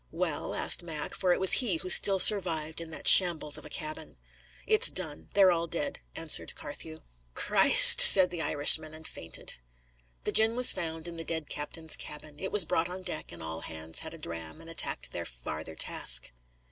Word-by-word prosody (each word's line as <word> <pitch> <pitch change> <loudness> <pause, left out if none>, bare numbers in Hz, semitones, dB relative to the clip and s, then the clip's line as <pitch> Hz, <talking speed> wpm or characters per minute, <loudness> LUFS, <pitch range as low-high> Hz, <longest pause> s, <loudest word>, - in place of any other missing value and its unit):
"Well?" - - -5
asked - - +1
Mac, 160 -3 -8
for 185 -2 -2
it - - -1
was 190 - +5
he 220 -8 -1
who 185 - -8
still 195 -1 +5
survived 170 -5 +2
in 165 - -10
that 160 - -8
shambles 165 -5 +5
of - - -18
a - - -11
cabin. 155 - -8 0.5
"It's 440 +3 +2
done; 160 -5 -4
they're 195 -2 +4
all 170 -1 -3
dead," 280 - -6 0.2
answered 165 -1 0
Carthew. 160 +2 -10 0.3
"Christ!" - - +6
said 185 -2 +8
the 175 -2 -6
Irishman, 155 +1 0
and 160 0 -9
fainted. 80 - -8 0.7
The - - -4
gin 220 +1 +2
was 250 0 +5
found 165 -1 -7
in 170 -1 -10
the 165 - -8
dead 160 -2 -7
captain's 160 +2 -3
cabin; 150 0 -12
it 190 - -7
was 205 -5 +2
brought 165 +2 -3
on 185 +1 -10
deck, 175 -4 -7
and 85 -1 -11
all 80 0 -8
hands 80 0 -8
had - - -10
a - - -14
dram, 80 - -9
and 165 0 -13
attacked 165 - -3
their - - -7
farther 75 +7 -10
task. 60 -5 -2
160 Hz, 195 wpm, -27 LUFS, 150-180 Hz, 0.7 s, said